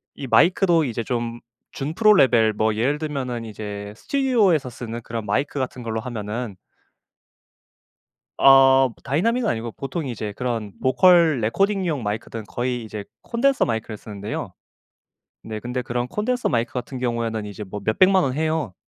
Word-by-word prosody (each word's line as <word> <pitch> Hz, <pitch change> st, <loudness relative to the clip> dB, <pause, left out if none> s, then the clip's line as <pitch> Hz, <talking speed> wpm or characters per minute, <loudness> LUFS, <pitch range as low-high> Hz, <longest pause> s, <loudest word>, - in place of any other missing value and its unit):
이 135 Hz, -, -6 dB
마이크도 170 Hz, +2 st, +4 dB
이제 115 Hz, -2 st, -3 dB
좀 120 Hz, -1 st, -3 dB, 0.3 s
준프로 190 Hz, +10 st, +3 dB
레벨, 115 Hz, -, +4 dB
뭐 110 Hz, +1 st, 0 dB
예를 135 Hz, +7 st, 0 dB
들면은 130 Hz, -6 st, -4 dB
이제 105 Hz, -1 st, -7 dB
스튜디오에서 220 Hz, -, +2 dB
쓰는 115 Hz, 0 st, -6 dB
그런 115 Hz, -1 st, -5 dB
마이크 140 Hz, +4 st, -1 dB
같은 130 Hz, -1 st, -4 dB
걸로 110 Hz, -1 st, -3 dB
하면은 110 Hz, -2 st, -5 dB, 1.8 s
어 135 Hz, -1 st, +7 dB
다이나믹은 225 Hz, -, +1 dB
아니고 115 Hz, 0 st, -2 dB
보통 140 Hz, +3 st, -5 dB
이제 110 Hz, -4 st, -4 dB
그런 115 Hz, -5 st, -3 dB
vocal 165 Hz, +1 st, +5 dB
recording용 175 Hz, -, 0 dB
마이크들은 110 Hz, +1 st, -4 dB
거의 120 Hz, 0 st, -3 dB
이제 105 Hz, -2 st, -7 dB, 0.2 s
콘덴서 265 Hz, +3 st, +2 dB
마이크를 110 Hz, -1 st, -3 dB
쓰는데요. 105 Hz, 0 st, -6 dB, 0.9 s
네. 110 Hz, -1 st, -6 dB
근데 125 Hz, +1 st, -3 dB
그런 120 Hz, 0 st, -3 dB
콘덴서 245 Hz, -, -1 dB
마이크 120 Hz, 0 st, 0 dB
같은 125 Hz, +1 st, -5 dB
경우에는 115 Hz, -3 st, -2 dB
이제 105 Hz, +1 st, -8 dB
뭐 105 Hz, +1 st, -7 dB
몇 110 Hz, -, 0 dB
1,000,000 185 Hz, 0 st, +5 dB
원 130 Hz, -1 st, -1 dB
해요. 155 Hz, -, -1 dB
125 Hz, 365 characters per minute, -23 LUFS, 110-155 Hz, 1.8 s, 어